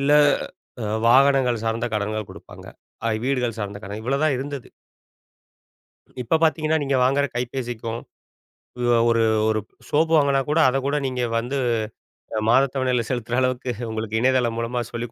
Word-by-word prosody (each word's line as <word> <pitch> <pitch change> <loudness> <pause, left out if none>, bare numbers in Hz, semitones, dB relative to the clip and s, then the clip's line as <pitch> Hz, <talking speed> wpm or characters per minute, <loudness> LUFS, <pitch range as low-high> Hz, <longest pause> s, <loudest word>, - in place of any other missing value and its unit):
இல்ல, 140 +1 +2 0.7
அ - - -2 0.2
வாகனங்கள் 130 -2 +4
சார்ந்த 115 +1 -1
கடன்கள் 105 0 -3
குடுப்பாங்க. - - -13 0.4
அ, - - +2 0.2
வீடுகள் 125 -4 -1
சார்ந்த 100 -1 -5
கடன், 100 +2 -6
இவ்வளோ 135 +4 -1
தான் 155 -3 +2
இருந்தது. 140 -1 -6 1.5
இப்ப 140 +7 +2
பார்த்தீங்கன்னா, 155 0 +2
நீங்க 135 -1 +1
வாங்குற 140 +2 +2
கைபேசிக்கும் 120 -2 -4 1.0
அ - - +3
ஒரு 115 -1 +3 0.3
ஒரு 110 0 +1 0.3
சோப்பு 160 +2 +2
வாங்கினா 140 -2 +3
கூட, 155 +2 +2
அதை 130 - 0
கூட, 140 +1 0
நீங்க 125 -1 -2 0.2
வந்து 125 +4 -3 0.8
அ - - -3
மாத 130 +4 +6
தவணையில 125 -3 +1
செலுத்துற 120 -1 -2
அளவுக்கு 130 0 -1 0.2
உங்களுக்கு 110 0 -2
இணையதளம் 125 -2 +2
மூலமா 120 +1 -2
சொல்லிக் 120 -1 -5
125 Hz, 145 wpm, -23 LUFS, 115-135 Hz, 1.5 s, மாத